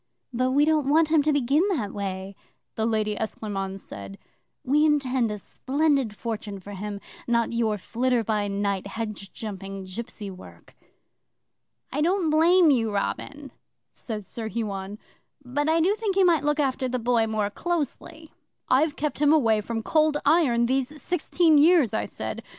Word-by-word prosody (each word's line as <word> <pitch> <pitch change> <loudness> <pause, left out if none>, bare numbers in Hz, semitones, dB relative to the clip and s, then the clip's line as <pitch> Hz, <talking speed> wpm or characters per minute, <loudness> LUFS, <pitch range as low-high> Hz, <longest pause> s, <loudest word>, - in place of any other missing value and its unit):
'"But 255 +2 +1
we 285 +3 +3
don't 305 -3 +2
want 315 +1 +4
him 315 -1 +4
to 305 +1 +1
begin 285 +1 +2 0.2
that 205 -6 -4
way," 195 -1 -5 0.4
the 220 0 -1
Lady 215 -2 0
Esclairmonde 195 -3 -4
said. 100 - -9 0.5
"We 290 +4 +3
intend 265 -6 +2
a 210 - -4
splendid 270 +1 0
fortune 210 -2 -5
for 200 +2 -11
him 205 +1 -5 0.3
not 235 -1 +1
your 225 -2 +1
flitter 240 +4 0
by 210 -1 0
night, 200 -1 -2
hedge 210 -2 -5
jumping, 195 -2 -7
gipsy 200 +1 -7
work." 185 - -14 1.2
'"I 295 - -1
don't 350 +1 +2
blame 330 +1 +5
you, 225 -5 +1
Robin," 275 +8 -4 0.4
says 215 -4 -6
Sir 220 +3 -5
Huon, 205 -3 -4 0.5
"but 290 +5 -1
I 325 +1 +3
do 360 +5 +3
think 425 -3 -2
you 385 -1 +4
might 330 -5 +3
look 295 +1 +1
after 265 -2 0
the 255 - -1
Boy 235 -1 +1
more 215 -2 -1
closely." 320 - -4 0.4
'"I've 290 +3 +3
kept 300 -1 -3
him 295 0 +4
away 225 -9 +3
from 225 +1 -4
Cold 310 +1 +2
Iron 280 -7 +4
these 265 +4 -1
sixteen 325 0 +2
years," 310 - +5
I 220 - 0
said. - - -5
240 Hz, 160 wpm, -25 LUFS, 210-300 Hz, 1.2 s, blame